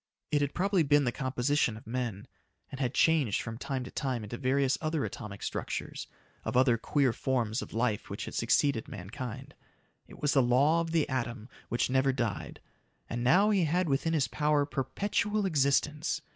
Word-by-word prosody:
It 145 - +2
had 145 -1 -1
probably 195 0 +2
been 145 -1 +4
the 120 - +1
composition 130 -2 0
of 110 - -14
men, 115 -4 -3 0.5
and 135 - -7
had 130 -2 -1
changed 155 -10 +3
from 115 0 -6
time 135 -2 -3
to 125 - -9
time 130 -5 -2
into 105 +3 -6
various 135 +1 +1
other 155 -2 -1
atomic 105 -6 -7
structures - - -4 0.4
of - - -1
other 130 -2 +5
queer 130 +2 +1
forms 120 -3 -1
of - - -8
life 115 -2 -1
which - - -5
had - - -7
succeeded 140 -6 +1
mankind. 125 +7 -7 0.5
It - - -14
was 145 - +1
the 135 - +5
law 140 +7 +4
of 165 - -3
the 160 -2 +1
atom 120 -3 -3 0.2
which 120 +1 0
never 135 +1 +3
died. 120 -6 -3 0.5
And 120 +1 -2
now 190 +12 +5
he 190 -5 +3
had 175 +3 +1
within 150 +3 +1
his 150 -5 +2
power 150 -1 +1
perpetual 200 - -1
existence. 150 -1 +1
135 Hz, 180 wpm, -30 LUFS, 120-150 Hz, 0.5 s, other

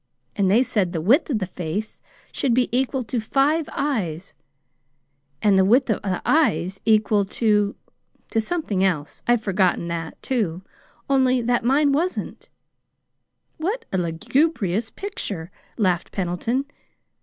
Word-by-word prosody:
And 195 -2 +2
they 225 +6 +5
said 205 -8 0
the 165 - -1
width 250 - +3
of 255 - +1
the 195 - -2
face 180 +4 -5 0.3
should 250 -4 0
be 250 -1 +1
equal 260 0 0
to 235 +2 -2
five 280 +7 +1
eyes, 195 - -2 1.1
and 200 -3 +5
the - - +5
width 235 +5 +4
of - - -1
the 190 -3 -3
eyes 195 - +2
equal 215 -2 +3
to 210 0 +1 0.6
to 225 - +2
something 220 - -1
else. 160 -6 -1
I've 240 -2 +3
forgotten 185 -3 +1
that, 165 -1 -5
too 195 -9 -1 0.4
only 260 -2 +3
that 240 +1 +1
mine 280 +4 +3
wasn't." 335 +6 -2 1.1
"What 405 +10 -2
a 190 - +2
lugubrious 210 - 0
picture!" 200 - -6 0.3
laughed 180 -6 0
Pendleton. 200 +9 -1
215 Hz, 135 wpm, -23 LUFS, 185-265 Hz, 1.1 s, they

